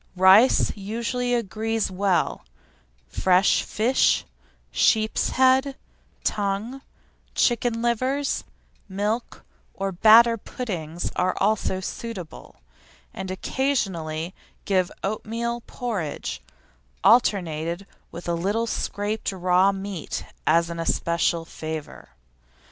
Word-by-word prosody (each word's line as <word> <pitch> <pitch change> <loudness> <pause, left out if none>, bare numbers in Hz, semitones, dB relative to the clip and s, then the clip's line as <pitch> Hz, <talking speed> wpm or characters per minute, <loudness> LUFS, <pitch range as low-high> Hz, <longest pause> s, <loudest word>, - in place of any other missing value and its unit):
Rice 190 +7 +5
usually 235 +4 -2
agrees 225 -1 -1
well; 190 -1 0 0.6
fresh 185 - +3
fish, 240 +5 +2 0.5
sheep's 220 - +2
head, 260 +1 +3 0.5
tongue, 210 +6 -2 0.5
chicken 235 -1 +1
livers, 255 +4 0 0.5
milk 210 +5 -3 0.3
or 195 0 -2
batter 225 +5 +6
puddings 175 -9 -5
are 185 +1 +1
also 200 -2 +1
suitable; 190 -4 -7 0.6
and 190 -1 -6
occasionally 185 - -2 0.3
give 185 -3 +1
oatmeal 230 +3 -3
porridge, 200 -12 -4 0.6
alternated 175 -5 +2 0.2
with 175 - -9
a 170 - 0
little 200 +7 0
scraped 210 -1 -2
raw 185 +1 +3
meat 195 -3 -5 0.2
as 165 +2 +3
an 170 - -6
especial 170 0 0
favour. 155 -2 -7
200 Hz, 90 wpm, -24 LUFS, 180-230 Hz, 0.6 s, batter